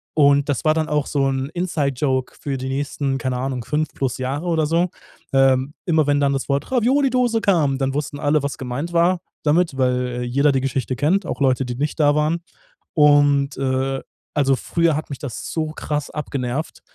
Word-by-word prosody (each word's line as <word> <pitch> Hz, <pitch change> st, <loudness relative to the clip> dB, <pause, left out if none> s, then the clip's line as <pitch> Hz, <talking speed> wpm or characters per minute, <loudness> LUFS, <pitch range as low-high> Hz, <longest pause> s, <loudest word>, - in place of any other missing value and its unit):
und 140 Hz, -1 st, +4 dB
das 135 Hz, -, -1 dB
war 155 Hz, -, +5 dB
dann 160 Hz, 0 st, 0 dB
auch 150 Hz, -1 st, 0 dB
so 140 Hz, -2 st, +1 dB
'n 135 Hz, +1 st, -2 dB
Inside-Joke 140 Hz, -7 st, -1 dB
für 140 Hz, -2 st, -2 dB
die 130 Hz, 0 st, -4 dB
nächsten, 135 Hz, 0 st, -2 dB
keine 130 Hz, -2 st, -2 dB
Ahnung, 130 Hz, -1 st, -3 dB
5 155 Hz, 0 st, -1 dB
plus 130 Hz, -3 st, -2 dB
Jahre 135 Hz, +5 st, -3 dB
oder 160 Hz, -3 st, +2 dB
so. 170 Hz, +2 st, +1 dB, 0.4 s
Ähm, 135 Hz, +1 st, +3 dB
immer 160 Hz, -5 st, +2 dB
wenn 145 Hz, 0 st, +3 dB
dann 140 Hz, -1 st, +3 dB
das 135 Hz, -, -2 dB
Wort 140 Hz, -, -1 dB
Ravioli-Dose 250 Hz, -2 st, +2 dB
kam, 155 Hz, -10 st, +2 dB
dann 135 Hz, 0 st, 0 dB
wussten 145 Hz, 0 st, -3 dB
alle, 145 Hz, 0 st, +1 dB
was 140 Hz, -, -3 dB
gemeint 135 Hz, +7 st, -4 dB
war 175 Hz, +2 st, +3 dB, 0.2 s
damit, 155 Hz, -1 st, +2 dB
weil 125 Hz, -1 st, 0 dB
jeder 140 Hz, +4 st, +2 dB
die 130 Hz, -, +1 dB
Geschichte 130 Hz, -1 st, -2 dB
kennt, 175 Hz, +8 st, +1 dB
auch -, -, -4 dB
Leute, 130 Hz, -1 st, +2 dB
die 125 Hz, -, -4 dB
nicht 150 Hz, +4 st, -3 dB
da 145 Hz, -1 st, +4 dB
waren. 155 Hz, +3 st, +1 dB, 0.5 s
Und, 145 Hz, -2 st, +4 dB
äh, 135 Hz, 0 st, -1 dB, 0.3 s
also 135 Hz, -3 st, +3 dB
früher 165 Hz, 0 st, +1 dB
hat 155 Hz, -, -5 dB
mich 140 Hz, -, -5 dB
das 130 Hz, -6 st, -6 dB
so 155 Hz, -1 st, -1 dB
krass 150 Hz, -1 st, -4 dB
abgenervt 140 Hz, 0 st, -4 dB
145 Hz, 190 wpm, -21 LUFS, 135-155 Hz, 0.5 s, war